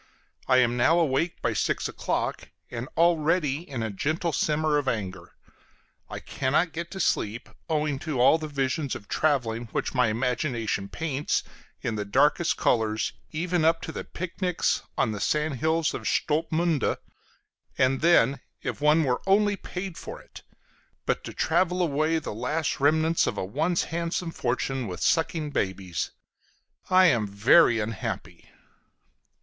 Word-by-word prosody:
I 130 - +5
am 120 -1 +3
now 160 +8 +4
awake 165 +1 0
by - - +1
six - - 0
o'clock, - - -3 0.2
and 120 +1 -5
already 165 -3 +2
in 125 -5 -3
a 110 - -2
gentle 155 - -1
simmer 150 +1 +1
of 140 - -5
anger; 100 -6 -4 0.7
I - - -5
cannot 155 +6 0
get 170 +1 -5
to 190 - -7
sleep, 110 - 0 0.2
owing 150 -3 0
to 155 -5 -3
all 130 +6 +5
the 155 - -4
visions 140 0 -1
of 105 - -9
traveling 120 -6 0
which - - -2
my 125 -3 +3
imagination 115 -3 -1
paints 150 +2 -1 0.4
in 110 - -2
the 105 - -1
darkest 150 +11 +2
colors, 110 -2 +1 0.2
even 175 +1 -1
up 165 +1 +4
to - - -5
the - - -5
"picnics" 180 0 -1 0.2
on - - +2
the 105 - -4
sandhills 155 +4 0
of - - -4
Stolpmünde. 160 -1 +1 0.8
And 130 +1 +2
then 140 -5 +4 0.2
if - - -4
one 150 +2 +4
were 125 -3 0
only 205 +1 +4
paid 185 -2 -6
for - - -8
it! - - -14 0.6
But - - 0
to - - -7
travel 180 0 +1
away 155 -1 +1
the 155 - -4
last 150 +10 -2
remnants 160 +3 +3
of 105 - -2
a - - -2
once 160 - 0
handsome 170 +1 -3
fortune 130 -1 -2
with 90 - -6
sucking 160 -2 +1
babies! 95 - -2 0.8
I 185 0 +6
am 115 - +3
very 115 +6 +5
unhappy! 105 -1 -5
150 Hz, 150 wpm, -26 LUFS, 120-165 Hz, 0.8 s, I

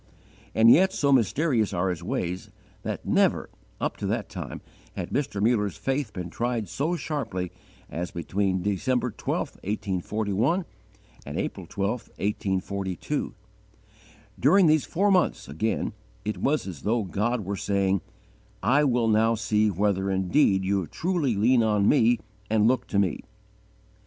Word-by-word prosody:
And 115 +1 +7
yet, 190 +6 +6
so 140 -5 +1
mysterious 125 - +2
are 90 +2 +1
His 85 -2 -5
ways, 90 +1 -3 0.3
that - - -4
never, - - +2 0.3
up - - -2
to - - -3
that - - -2
time, - - -6 0.3
had - - -5
Mr. 135 -8 -1
Muller's 105 -3 +1
faith 135 -4 -1
been 90 -3 -6
tried 120 -2 -1
so 155 - -1
sharply 115 - -3 0.4
as 85 +2 -4
between 95 +2 -1
December 125 +5 0
12, - - -3
1841, 105 - -1 0.6
and - - -6
April - - -3
12, 100 0 -1 0.3
1842. 100 - -2 1.0
During 180 +9 +5
these 155 -2 +4
four 200 +4 +1
months, 185 -2 +2
again, 95 +11 -1 0.3
it 105 - -2
was 150 +2 +1
as 90 -8 -7
though 115 +1 +1
God 105 +4 -1
were 100 +2 -2
saying, 100 -1 +1 0.6
"I 135 +8 +4
will 120 -4 +2
now 110 +1 +3
see 110 -1 +2
whether 100 0 0
indeed 95 +1 +2
you 95 -3 0
truly 160 - 0
lean 120 +5 +4
on 105 -2 +2
Me 120 -4 +4 0.3
and 110 0 +3
look 125 -1 +1
to 100 - -1
Me." 95 -5 +1
105 Hz, 140 wpm, -26 LUFS, 95-130 Hz, 1.0 s, And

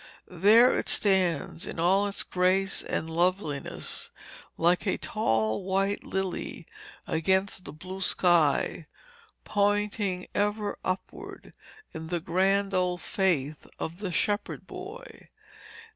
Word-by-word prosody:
There 210 +8 +5
it - - -3
stands 180 -5 +1
in - - -6
all 190 +4 +3
its 200 - -1
grace 185 +1 +1
and 160 - -3
loveliness 165 -3 -2 0.5
like 175 +5 +2
a 190 - +1
tall 110 - 0
white 195 +2 0
lily 190 -1 -4 0.4
against 190 +3 0
the - - -7
blue 185 +5 -8
sky, 170 -4 +2 0.6
pointing 205 -2 0
ever 205 0 -1
upward, 185 +1 -5 0.4
in 160 0 -6
the 175 +1 -1
grand 195 +4 +1
old 180 -1 +1
faith 155 -7 0
of 165 +3 -5
the 200 -3 -3
shepherd 205 +4 -1
boy. 400 +7 -10
190 Hz, 115 wpm, -28 LUFS, 170-200 Hz, 0.6 s, There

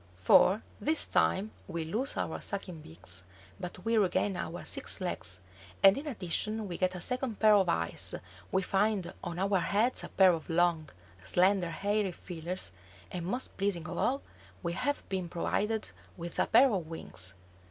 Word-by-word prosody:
For 180 - +5 0.2
this 310 +1 +2
time 205 +3 +1 0.2
we 170 -4 -3
lose 225 - -1
our - - -2
sucking 185 -5 -3
beaks, 90 - -8 0.4
but 180 0 -7
we 225 0 +3
regain 195 0 +1
our 175 0 -5
six - - -2
legs, 95 - -3 0.4
and 195 0 +9
in 295 +3 -5
addition 215 - -2
we 175 - -5
get 185 0 +1
a 180 - -6
second 250 -2 0
pair 215 -1 +6
of 195 -2 +4
eyes, 85 0 +4 0.4
we 190 0 +1
find 200 -1 0
on 175 -1 -4
our 195 +1 +2
heads 210 +8 +1
a - - -6
pair 190 -2 +5
of 165 0 -5
long, 165 -2 +2 0.3
slender, 180 - +3
hairy 200 +1 -1
feelers, 175 - -6 0.4
and, 175 -1 -4
most 250 +7 -3
pleasing 190 -4 -1
of 175 - -5
all, 275 +3 +1 0.4
we 170 - -1
have 285 +10 -2
been 185 -3 -3
provided 210 +5 -1 0.3
with 170 -1 -6
a - - +3
pair 265 -2 +6
of 180 -5 -2
wings. 95 - -6
185 Hz, 170 wpm, -31 LUFS, 170-210 Hz, 0.4 s, and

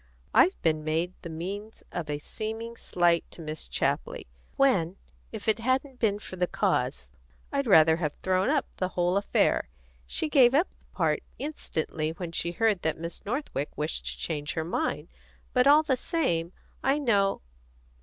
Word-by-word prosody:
I've 375 - +5
been 155 -2 +2
made 165 +3 0
the 170 - -7
means 195 +7 -6
of 170 -4 -4
a 145 - -1
seeming 225 +8 -5
slight 175 -5 +2
to - - -11
Miss 155 -1 -5
Chapley, - - -1 0.3
when, 195 -10 +3 0.3
if - - -7
it 220 0 +3
hadn't 260 +2 0
been 205 -3 +2
for 185 -2 -8
the 180 0 +1
cause, 65 - 0 0.4
I'd 280 -2 0
rather 160 -5 +7
have 150 -4 -2
thrown 185 +3 +2
up 290 -2 +2
the 185 - 0
whole 175 +1 +2
affair. 200 0 +2 0.4
She 315 - -1
gave 265 -4 +5
up 330 +6 +3
the - - -32
part - - +1 0.2
instantly 160 - -3
when 170 0 -6
she 170 0 -2
heard 215 -2 +2
that 160 - 0
Miss 170 +1 -6
Northwick 225 - -2
wished 150 +1 -2
to - - -4
change 150 -2 -3
her 160 -1 -2
mind, 250 - -1 0.5
but 250 +1 +4
all 295 +2 +7
the 285 -4 +2
same 175 - 0 0.3
I 270 +2 +3
know 205 - +2
185 Hz, 170 wpm, -28 LUFS, 165-250 Hz, 0.5 s, rather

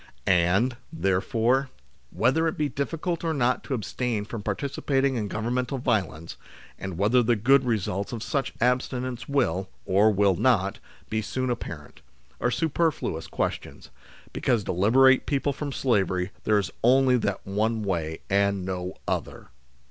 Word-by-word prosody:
And, 95 +8 +3
therefore, 115 - +1 0.4
whether 135 - +2
it 160 - -2
be 150 - +1
difficult 165 +5 -3
or 165 -1 0
not 125 -2 +1
to 135 - -1
abstain 115 -1 -2
from 110 0 -6
participating 135 +5 -1
in 110 -3 -2
Governmental 125 +6 -2
violence, 95 -10 -2 0.4
and 95 -3 -5
whether 110 +6 +4
the 120 0 +2
good 130 +5 +4
results 100 -4 -1
of 115 -2 -5
such 140 -3 -1
abstinence 125 +1 -1
will, 95 -10 0 0.2
or 100 +3 +4
will 100 -2 +3
not, 100 -3 +2 0.3
be 110 0 0
soon 130 +4 -2
apparent, 85 -11 -7 0.4
are 120 - +1
superfluous 155 - -1
questions; - - -4 0.4
because 115 -4 +1
to - - -2
liberate 130 +8 +4
people 140 0 0
from 145 +1 -5
slavery 95 -8 0
there 105 - +4
is 100 -2 -1
only 130 +1 +5
that 100 -4 -2
one 110 +3 0
way, 80 -5 -2
and 100 -1 +1
no 90 -1 -4
other - - -3
115 Hz, 145 wpm, -26 LUFS, 100-130 Hz, 0.4 s, only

